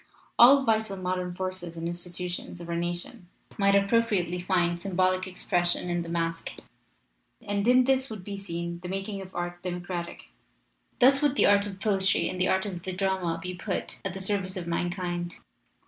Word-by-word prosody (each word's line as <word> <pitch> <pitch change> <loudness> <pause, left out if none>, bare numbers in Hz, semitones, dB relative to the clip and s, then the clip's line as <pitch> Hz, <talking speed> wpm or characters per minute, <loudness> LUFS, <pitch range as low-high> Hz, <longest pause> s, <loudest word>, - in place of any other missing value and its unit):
All 270 +3 +9
vital 220 -3 +1
modern 180 -1 -2
forces 185 -2 -5
and 165 0 -3
institutions 175 +1 -4
of 170 - -8
our 170 - -2
nation 175 +1 -3 0.3
might 200 0 +4
appropriately 200 -4 +2
find 175 -2 +1
symbolic 185 0 +1
expression 175 -1 +1
in 175 0 0
the 170 - -6
masque. 165 -1 -2 0.9
"And 205 -2 -1
in 255 +1 +6
this 265 +1 +1
would 215 -4 -7
be 200 +1 -5
seen 170 -3 -5
the 180 0 -7
making 195 +1 -3
of 190 0 -11
art 175 0 -4
democratic. 175 - -5 0.7
Thus 270 +3 +6
would 290 -2 +2
the - - +4
art 200 0 +4
of 195 -2 -8
poetry 195 -2 +2
and 185 - -4
the 185 - +3
art 190 +1 +2
of 185 -4 -5
the 185 +1 -4
drama 185 -3 0
be 180 +2 -5
put 180 +1 -4
at 195 -2 -4
the 190 - -3
service 190 -1 0
of 180 - -4
man 170 +1 -1
kind. 175 -1 -3
185 Hz, 180 wpm, -27 LUFS, 175-200 Hz, 0.9 s, All